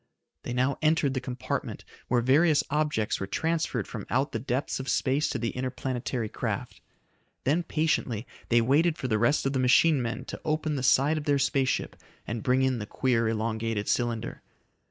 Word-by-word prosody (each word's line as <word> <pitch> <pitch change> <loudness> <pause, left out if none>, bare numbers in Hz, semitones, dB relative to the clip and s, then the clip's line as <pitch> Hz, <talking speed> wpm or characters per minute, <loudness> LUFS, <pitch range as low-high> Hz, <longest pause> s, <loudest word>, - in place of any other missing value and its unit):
They - - -6
now 130 +2 0
entered 155 -3 +2
the 130 - -2
compartment 125 -1 -4 0.2
where 120 -1 +2
various 150 +5 +4
objects 150 -8 0
were 95 - -3
transferred 160 -5 -1
from 110 -5 -7
out 130 +4 +1
the 115 - -2
depths 130 +4 -2
of 130 - -4
space 140 +3 +1
to - - -2
the 115 -1 -2
interplanetary 130 -2 -3
craft. - - -4 0.6
Then 150 +7 +2
patiently 155 -9 -1 0.2
they 120 0 +5
waited 155 +7 +3
for 130 - -3
the 110 -3 +1
rest 125 +7 +2
of 135 - 0
the 130 - 0
machine 130 +3 +4
men 115 0 -3
to - - -7
open 155 -1 -1
the 135 - -2
side 140 +4 +3
of 145 - -8
their 145 -1 +3
space 135 -1 +1
ship - - -2 0.3
and 115 0 -4
bring 130 +3 +2
in 130 -2 +1
the 105 - -5
queer, 115 -3 +1
elongated 110 -1 -2
cylinder. 120 -2 -1
130 Hz, 185 wpm, -28 LUFS, 115-145 Hz, 0.6 s, they